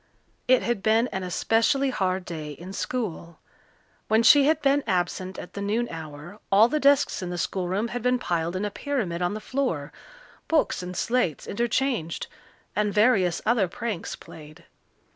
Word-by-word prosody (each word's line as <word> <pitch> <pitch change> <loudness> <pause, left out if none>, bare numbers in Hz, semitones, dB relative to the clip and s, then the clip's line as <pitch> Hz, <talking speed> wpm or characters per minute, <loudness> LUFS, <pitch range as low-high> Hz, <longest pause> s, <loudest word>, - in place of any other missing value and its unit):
It 255 0 +4
had 235 -4 -1
been 220 +3 +3
an 190 - -4
especially 225 - +1
hard 185 -4 -1
day 155 -3 -6
in 180 +6 -10
school. 185 -9 -4 0.7
When 220 +1 +3
she 280 +4 +7
had 310 +1 +3
been 280 0 +3
absent 185 +1 -1
at - - -9
the 200 - -5
noon 220 +4 0
hour 160 +3 -9
all 205 +3 +7
the 305 +5 0
desks 280 -5 +3
in 180 - -4
the 175 - -4
schoolroom 190 +5 -1
had 245 +1 -4
been 250 +2 +2
piled 170 -6 -2
in 190 +3 -1
a 205 - -3
pyramid 215 - -2
on 175 +3 0
the - - -4
floor, 215 - -2 0.5
books 320 - +1
and 180 0 -6
slates 235 - 0
interchanged, 235 - -1 0.5
and 210 -1 +1
various 200 -6 +3
other 225 -4 +3
pranks 210 0 -4
played. 155 -1 -13
205 Hz, 165 wpm, -25 LUFS, 175-245 Hz, 0.7 s, she